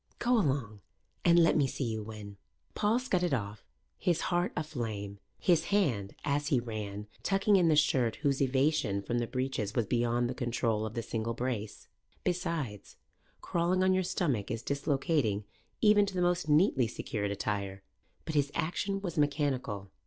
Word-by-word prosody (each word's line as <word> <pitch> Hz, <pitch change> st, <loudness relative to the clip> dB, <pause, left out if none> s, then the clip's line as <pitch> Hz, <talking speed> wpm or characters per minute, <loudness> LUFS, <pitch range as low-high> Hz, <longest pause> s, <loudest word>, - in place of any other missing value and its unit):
"Go 245 Hz, +1 st, +1 dB
along 135 Hz, -, 0 dB, 0.4 s
and 170 Hz, -1 st, +5 dB
let 165 Hz, -1 st, +5 dB
me 145 Hz, -3 st, +3 dB
see 135 Hz, -, -3 dB
you 110 Hz, -3 st, -2 dB
win." 105 Hz, -2 st, -9 dB, 0.4 s
Paul 210 Hz, +2 st, +2 dB
scudded 180 Hz, -, +1 dB
off, 105 Hz, -3 st, -5 dB, 0.4 s
his 175 Hz, -3 st, +1 dB
heart 175 Hz, +1 st, +1 dB
aflame, 110 Hz, -10 st, -4 dB, 0.2 s
his 175 Hz, -4 st, +2 dB
hand, 135 Hz, -, 0 dB
as 145 Hz, 0 st, 0 dB
he 135 Hz, -3 st, +3 dB
ran, 105 Hz, -3 st, -5 dB, 0.2 s
tucking 195 Hz, +2 st, +3 dB
in 180 Hz, -3 st, +4 dB
the 155 Hz, -, +4 dB
shirt 130 Hz, -6 st, +3 dB
whose 140 Hz, -1 st, +1 dB
evasion 130 Hz, -6 st, +1 dB
from 120 Hz, +4 st, -1 dB
the 120 Hz, -, -1 dB
breeches 130 Hz, -5 st, -2 dB
was 120 Hz, -, +2 dB
beyond 120 Hz, +1 st, +1 dB
the 125 Hz, -, -3 dB
control 115 Hz, -3 st, -1 dB
of 110 Hz, -, -9 dB
the 115 Hz, -, -2 dB
single 115 Hz, +1 st, -3 dB
brace. 120 Hz, -4 st, -4 dB, 0.4 s
Besides, 165 Hz, -, -3 dB, 0.5 s
crawling 180 Hz, +2 st, +1 dB
on 185 Hz, 0 st, +4 dB
your 185 Hz, -, +2 dB
stomach 145 Hz, -, -1 dB
is 115 Hz, +1 st, -3 dB
dislocating 140 Hz, -, 0 dB, 0.4 s
even 210 Hz, -2 st, +5 dB
to 195 Hz, -, -5 dB
the 180 Hz, -, 0 dB
most 175 Hz, -2 st, +1 dB
neatly 150 Hz, -, +4 dB
secured 105 Hz, -2 st, -3 dB
attire. 100 Hz, -1 st, -3 dB, 0.4 s
But 160 Hz, -, -4 dB
his 145 Hz, -1 st, +1 dB
action 195 Hz, +4 st, -1 dB
was 175 Hz, -5 st, -3 dB
mechanical. 135 Hz, -9 st, -1 dB
135 Hz, 165 wpm, -31 LUFS, 110-170 Hz, 0.5 s, and